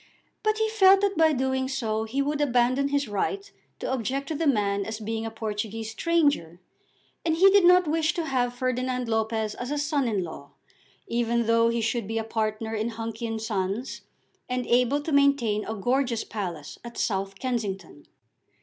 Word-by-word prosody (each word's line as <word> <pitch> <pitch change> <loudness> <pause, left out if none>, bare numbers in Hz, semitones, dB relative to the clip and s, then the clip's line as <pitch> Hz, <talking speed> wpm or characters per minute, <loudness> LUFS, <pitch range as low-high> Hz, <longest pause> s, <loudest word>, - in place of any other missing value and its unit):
But 430 0 +1
he 440 0 +1
felt 395 -3 +5
that 400 -1 +1
by 320 -1 +4
doing 265 -1 0
so 225 -5 -2
he 265 +5 -1
would 295 +1 -1
abandon 255 0 +2
his 280 -1 0
right 390 - -2 0.3
to - - -4
object 265 +3 -2
to 315 - -2
the 320 +1 0
man 200 -6 +1
as 220 +2 -5
being 225 +1 -3
a - - -3
Portuguese 220 0 -4
stranger, 285 - +1 0.6
and 325 -1 +1
he 385 +4 +6
did 395 -2 +5
not 360 -1 +6
wish 315 +1 +1
to 335 - -2
have 245 -4 0
Ferdinand 255 0 -1
Lopez 220 -1 -1
as 245 - -6
a 295 - -1
son 290 -2 0
in 205 -5 0
law, 160 -4 -9 0.5
even 235 0 0
though 230 +1 +4
he 235 0 0
should 225 -1 -1
be 225 +1 -2
a 225 - 0
partner 220 0 -2
in 220 +1 -1
Hunky 225 0 -5
and 225 0 -3
Sons, 215 +2 -3 0.5
and 250 -1 -1
able 250 +4 +2
to 310 - -4
maintain 280 -7 +3
a 220 - -4
gorgeous 245 +2 0
palace 175 -8 -6
at 235 0 -9
South 195 -1 -1
Kensington. 195 - -4
235 Hz, 185 wpm, -26 LUFS, 220-280 Hz, 0.6 s, he